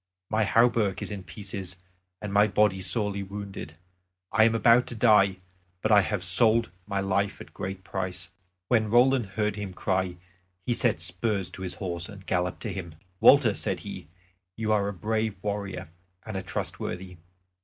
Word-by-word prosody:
My 110 0 +2
hauberk 115 -2 +2
is - - -6
in 100 -2 -5
pieces, 95 -3 -6 0.5
and 100 -1 -4
my 105 +1 +5
body 105 -2 +2
sorely 105 -1 -1
wounded. 100 -5 -7 0.6
I 110 -1 +5
am 115 0 +3
about 115 +2 +5
to 120 - -5
die; 105 -4 +4 0.5
but 110 - +1
I 105 -1 +8
have 100 -1 -2
sold 110 +3 +3 0.2
my 100 -1 -1
life 100 +1 0
at - - -10
a - - -31
great 95 0 -5
price." 90 -3 -4 0.4
When 110 -3 +2
Roland 120 0 +4
heard 105 -1 0
him 100 -3 -5
cry 95 -2 -1 0.5
he 120 - +1
set 115 -8 +2
spurs 95 +3 0
to - - -10
his 90 -1 -4
horse 85 -2 -4
and 100 -2 -11
galloped 90 0 -1
to - - -3
him. 85 -4 -7 0.2
"Walter," 135 -7 +7
said - - -2
he, - - -8 0.5
"you 110 -1 -1
are 100 -2 +2
a - - -1
brave 110 +2 -1
warrior 100 -4 -4 0.4
and 110 - -6
a 95 - -2
trustworthy. 90 0 -5
100 Hz, 175 wpm, -27 LUFS, 95-110 Hz, 0.6 s, I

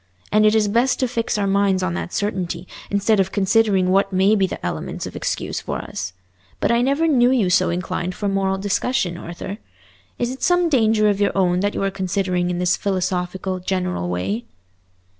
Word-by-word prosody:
And 215 0 +5
it 215 - +3
is 215 -1 +3
best 235 +5 +2
to 255 - +2
fix 230 -2 -1
our 205 - 0
minds 195 -1 +2
on 175 -2 -1
that 175 - -4
certainty, 185 -4 -3 0.2
instead 200 +1 +2
of 190 0 +1
considering 200 -2 +2
what 195 +1 +2
may 190 +3 +3
be 195 -2 +2
the - - -6
elements - - -4
of - - -8
excuse - - -2
for - - -3
us. - - -6 0.5
But - - +1
I 235 0 +3
never 280 +6 +2
knew 250 -5 +4
you 230 -8 +2
so - - +3
inclined 180 +1 -3
for 205 - -3
moral 195 -1 0
discussion, 200 0 0
Arthur? 175 +4 -7 0.6
Is 240 0 -1
it 260 - -8
some 355 -1 +3
danger 220 -6 +3
of 205 -1 +1
your 200 - +1
own 180 -2 +2
that 205 +2 -1
you - - -1
are 195 - 0
considering 185 -1 -1
in 175 - -2
this 180 0 +2
philosophical, 185 -1 -2
general 180 - -2
way?" 95 +6 -2
195 Hz, 195 wpm, -21 LUFS, 180-215 Hz, 0.6 s, And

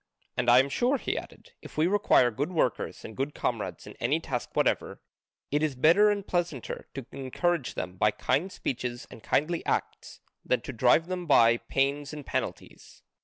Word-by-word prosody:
And 125 0 +1
I 120 - +8
am 135 +2 +5
sure," 250 - +1
he - - -3
added, - - -8
"if - - -12
we 155 - +3
require 185 - +4
good 145 +10 -3
workers 155 -9 -1
and 110 - -9
good 135 +2 -3
comrades 105 -8 -3
in - - -10
any 140 +7 +1
task 130 -6 -4
whatever, - - 0 0.5
it 145 +1 +1
is 155 -3 0
better 170 +11 +5
and 200 -1 -1
pleasanter 175 - -3
to 135 -3 -5
encourage 140 +2 -1
them 90 0 -5
by 105 - +4
kind 160 - -1
speeches 125 -6 -4
and 115 - -11
kindly 165 +8 0
acts - - -3 0.2
than 125 - +1
to 130 +3 -7
drive 125 +7 +4
them 180 -1 -4
by 115 -5 +6
pains 140 +3 -1
and 150 -2 -8
penalties. - - -5
140 Hz, 180 wpm, -28 LUFS, 125-170 Hz, 0.5 s, I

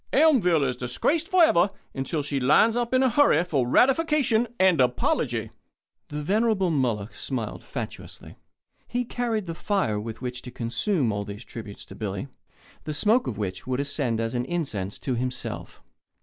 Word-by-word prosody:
Elmville 230 - +4
is 125 -2 -1
disgraced 125 - 0
forever 315 - +5 0.2
until 145 +3 -2
she 140 -1 -1
lines 150 - +4
up 240 -1 -1
in 260 0 +3
a 260 - +4
hurry 230 - +4
for 140 -8 0
ratification 265 - +3
and 185 -6 +5
apology." 125 -1 0 0.6
The 150 0 -5
venerable 205 0 +2
Moloch 115 -8 -1
smiled 115 -1 -4
fatuously. - - -8 0.5
He 245 0 -2
carried 230 -4 -2
the 165 - -4
fire 165 - 0
with 110 +1 -6
which 125 0 -5
to - - -9
consume 120 - -1
all 100 0 -2
these 100 +3 -8
tributes 110 -3 -9
to - - -12
Billy, 100 +3 -4 0.6
the 155 -1 -4
smoke 220 - +2
of 110 - -3
which 100 +1 -4
would 130 0 -1
ascend 140 -5 -1
as 115 0 -2
an 125 0 -1
incense 120 - -3
to 130 - -3
himself. 125 +1 -4
145 Hz, 165 wpm, -25 LUFS, -, 0.6 s, forever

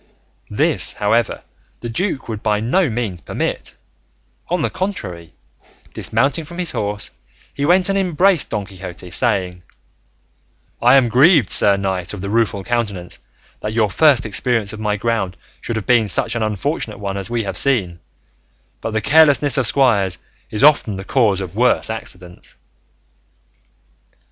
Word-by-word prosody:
This, - - +1
however, 110 +2 0 0.4
the 120 - -5
duke 170 - -2
would 110 -2 -5
by 105 -2 0
no 150 - +1
means 110 -7 -4
permit; - - -4 0.7
on 175 -2 0
the - - -1
contrary, 90 - -5 0.6
dismounting 140 +4 -1
from 170 +3 -11
his 180 -2 -1
horse, 105 0 -3 0.4
he 140 - -2
went 180 +2 +3
and 195 - 0
embraced 185 -2 +2
Don 105 -2 -3
Quixote, 90 -2 -10
saying, 95 -7 0 1.2
"I 125 +3 +6
am 130 -3 +4
grieved, 135 - +4
Sir 100 -1 +5
Knight 95 -1 -3
of 95 - -8
the 100 +1 -4
Rueful 110 -3 0
Countenance, 100 -6 -3 0.4
that 105 - -4
your 110 -3 +1
first 140 -1 +4
experience 110 0 0
on 110 - -8
my 105 -1 0
ground 105 -4 -2 0.2
should 115 - -4
have 110 - -4
been 120 -3 +3
such 110 +3 +2
an 115 - -2
unfortunate 110 - -2
one 100 -1 -4
as 100 +1 -5
we 120 -1 -1
have 95 -2 -5
seen; 95 -9 0 0.8
but 115 - -4
the 110 - 0
carelessness 145 0 +4
of 130 -4 +2
squires 105 -10 +2 0.3
is 110 +4 -1
often 145 -8 +4
the 95 - -6
cause 105 -7 +1
of 95 -1 -7
worse 120 -1 +2
accidents." 90 -5 -8
110 Hz, 155 wpm, -18 LUFS, 100-135 Hz, 1.2 s, I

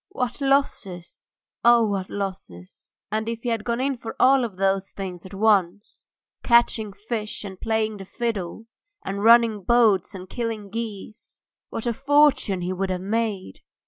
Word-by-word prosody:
What 250 -6 -3
losses! 245 -11 -1 0.3
Ah! 235 0 +6
What 200 -3 -2
losses! 185 - -7 0.2
And 220 +1 -1
if 230 0 -5
he 245 - -1
had 225 -2 -1
gone 235 +1 -2
in 270 +1 0
for 230 -2 -8
all 260 -2 +4
those 195 0 0
things 185 -2 -7
at 190 - -14
once 205 -2 +1 0.3
catching 235 -3 +3
fish 215 +2 -4
and 190 -2 -9
playing 220 -1 -1
the 195 - -9
fiddle, 220 -2 -4 0.4
and 200 +1 -3
running 230 -2 +5
boats 225 -2 +3
and 185 0 -8
killing 220 -3 -4
geese 220 -2 -7 0.3
what 225 - -5
a 235 - 0
fortune 275 -7 +3
he 180 +1 -2
would 190 +1 -2
have 185 -1 -2
made! 205 - -2
215 Hz, 155 wpm, -24 LUFS, 195-235 Hz, 0.4 s, Ah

